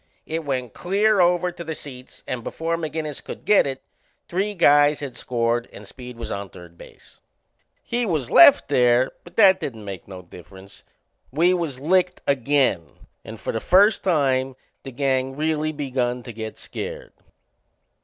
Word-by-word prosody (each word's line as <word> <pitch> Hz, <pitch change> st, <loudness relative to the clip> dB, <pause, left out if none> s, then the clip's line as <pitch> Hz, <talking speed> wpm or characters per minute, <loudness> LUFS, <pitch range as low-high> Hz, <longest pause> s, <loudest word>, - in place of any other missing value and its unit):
It 160 Hz, +1 st, -4 dB
went 130 Hz, -5 st, -3 dB
clear 200 Hz, +3 st, +1 dB
over 180 Hz, 0 st, +2 dB
to 170 Hz, -, -9 dB
the 160 Hz, -1 st, -5 dB
seats 130 Hz, -4 st, -11 dB
and 125 Hz, -2 st, -5 dB
before 165 Hz, +6 st, -3 dB
McInnes 155 Hz, -3 st, -5 dB
could -, -, -9 dB
get 210 Hz, -8 st, +4 dB
it 135 Hz, -1 st, -6 dB, 0.4 s
three 200 Hz, +4 st, -2 dB
guys 145 Hz, -3 st, +4 dB
had 140 Hz, -3 st, -7 dB
scored 120 Hz, -1 st, -1 dB
and 105 Hz, -, -12 dB
Speed 125 Hz, +2 st, -10 dB
was 115 Hz, -, -6 dB
on 100 Hz, -1 st, -5 dB
third 85 Hz, 0 st, -14 dB
base. -, -, -16 dB, 0.6 s
He 240 Hz, +1 st, -2 dB
was 155 Hz, -, -2 dB
left 285 Hz, -, +7 dB
there, 125 Hz, -1 st, +3 dB
but 175 Hz, 0 st, -16 dB
that 195 Hz, -4 st, +6 dB
didn't 110 Hz, -5 st, -6 dB
make 95 Hz, -3 st, -8 dB
no 95 Hz, -2 st, -10 dB
difference. 95 Hz, +3 st, -14 dB, 0.5 s
We 170 Hz, +7 st, +2 dB
was 165 Hz, -8 st, -3 dB
licked 180 Hz, +4 st, +1 dB
again 135 Hz, -, +1 dB, 0.4 s
and -, -, -10 dB
for -, -, -3 dB
the 115 Hz, -, -1 dB
first 200 Hz, +3 st, +4 dB
time 135 Hz, -6 st, +1 dB, 0.3 s
the 135 Hz, -, -9 dB
gang 130 Hz, 0 st, -1 dB
really 155 Hz, 0 st, -1 dB
begun 130 Hz, -4 st, -2 dB
to 120 Hz, -, -9 dB
get 110 Hz, 0 st, -7 dB
scared. -, -, -7 dB
140 Hz, 165 wpm, -23 LUFS, 120-170 Hz, 0.6 s, left